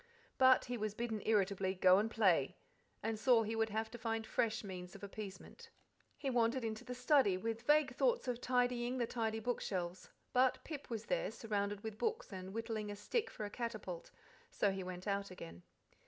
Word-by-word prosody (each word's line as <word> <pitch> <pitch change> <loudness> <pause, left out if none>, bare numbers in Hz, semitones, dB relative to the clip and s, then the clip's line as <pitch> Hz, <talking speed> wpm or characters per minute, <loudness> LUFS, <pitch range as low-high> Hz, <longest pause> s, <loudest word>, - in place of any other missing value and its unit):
But 260 -1 +7
he 245 -1 -3
was 215 -1 -2
bidden 225 -2 -2
irritably 195 -3 +2
"go 185 +1 +6
and 215 +2 0
play," 190 - +3 0.5
and 220 0 -1
saw 235 -1 +5
he 220 +1 -2
would 225 0 +1
have 220 +1 -2
to 240 - -8
find 225 -1 -1
fresh 225 0 0
means 180 -2 -7
of 200 - -11
appeasement. 205 - -8 0.5
He 280 - -4
wandered 240 +1 +2
into 220 -1 -3
the 250 - -6
study, 250 -6 +4
with 225 +3 -3
vague 295 0 +4
thoughts 485 - +2
of 245 -1 -2
tidying 245 0 +1
the 240 - +1
tidy 225 -2 -1
bookshelves; 190 -6 -3 0.2
but 255 0 +4
Pip 300 -3 -7
was 225 -2 -4
there, - - 0
surrounded 205 -2 -2
with 220 -1 -6
books 450 - -1
and 185 0 -6
whittling 225 -1 -3
a 205 - -4
stick 430 - -1
for 210 - -5
a 205 - -6
catapult, 215 -8 -5 0.4
so 200 - +1
he 190 0 -3
went 180 0 -6
out 200 -1 -1
again. 85 - -9
220 Hz, 190 wpm, -37 LUFS, 200-245 Hz, 0.5 s, But